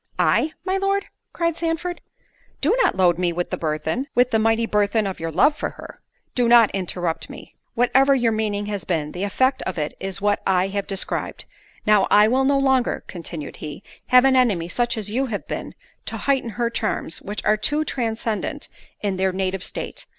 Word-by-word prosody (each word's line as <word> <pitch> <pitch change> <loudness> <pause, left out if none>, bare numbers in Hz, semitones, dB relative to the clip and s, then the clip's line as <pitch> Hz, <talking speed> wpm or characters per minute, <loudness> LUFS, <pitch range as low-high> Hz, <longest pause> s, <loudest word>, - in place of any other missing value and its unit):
"I, 315 - +2
my 380 0 0
Lord?" 395 +1 0 0.3
cried 335 -1 -1
Sandford; 335 +1 -3 0.6
"do 330 - +2
not - - +2
load 175 -2 +3
me 175 -1 +1
with 175 +1 -3
the - - 0
burthen—with 230 - 0
the 220 - +3
mighty 225 +1 +2
burthen 210 0 +1
of 190 -1 -4
your 165 0 -3
love 295 - +4
for - - -3
her." - - -11 0.3
"Do 245 -2 +2
not 235 -2 +6
interrupt 175 -3 -2
me. - - -11 0.2
Whatever 265 +3 +4
your 240 -3 +2
meaning 210 -2 -1
has 205 -3 -4
been, 155 -3 -2
the 180 - -6
effect 260 +7 +1
of 185 - -4
it 150 -1 -3
is 195 -1 -3
what 205 0 +1
I 185 0 +2
have 200 0 -3
described. 195 -2 0 0.4
Now, 210 -2 +4
I 210 +1 +6
will 260 +4 +2
no 280 +1 +3
longer," 265 -2 +1
continued 165 -4 -7
he, 150 +5 -8 0.2
"have 250 +1 +6
an 265 -1 +4
enemy, 205 -10 +2
such 240 +3 0
as 210 -1 -4
you 265 +4 0
have 210 -4 -5
been, - - -5 0.3
to - - -3
heighten 270 -4 0
her 235 -1 0
charms, 215 -7 -2
which 205 +2 -6
are 215 - +4
too 295 +8 0
transcendent 225 -4 -3 0.3
in 200 -2 -1
their 190 0 +1
native 190 0 -2
state. - - -5
215 Hz, 195 wpm, -22 LUFS, 190-260 Hz, 0.6 s, not